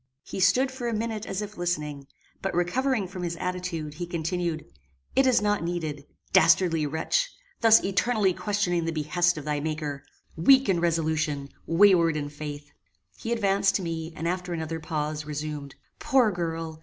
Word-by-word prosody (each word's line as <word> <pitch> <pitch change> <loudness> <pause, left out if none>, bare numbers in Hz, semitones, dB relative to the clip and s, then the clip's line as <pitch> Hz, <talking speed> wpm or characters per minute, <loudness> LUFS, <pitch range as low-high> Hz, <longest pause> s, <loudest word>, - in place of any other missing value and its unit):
He - - -6
stood 220 +9 +3
for 260 -2 -5
a 230 - -1
minute 220 -1 -3
as 195 +2 -3
if 210 0 -9
listening; 150 -5 -3 0.3
but 195 -2 -2
recovering 220 +5 +1
from 185 0 -7
his 170 -1 -2
attitude, 180 -4 -4
he 175 +3 -5
continued 170 -1 -2 0.5
"It 270 0 +4
is 250 -4 +4
not 205 0 +1
needed. 155 -4 -4 0.3
Dastardly 170 -4 +4
wretch! 165 - 0 0.3
thus 225 -1 +6
eternally 200 0 +2
questioning 180 -4 0
the 165 - -1
behests 165 +3 +1
of 150 - -6
thy 150 -1 -1
Maker! 150 -2 -3 0.3
weak 265 +11 +5
in 185 -3 +2
resolution! 160 -4 0 0.2
wayward 170 -3 +5
in 145 -1 -3
faith!" 145 -1 -7 0.4
He 230 - -5
advanced 200 -3 +2
to 195 - 0
me, 165 -1 -4
and, 165 - -3
after 180 0 -2
another 160 0 -3
pause, 155 -1 -3
resumed: 150 -2 -5 0.2
"Poor 255 -5 +3
girl! 165 -2 -4
175 Hz, 165 wpm, -26 LUFS, 155-195 Hz, 0.5 s, thus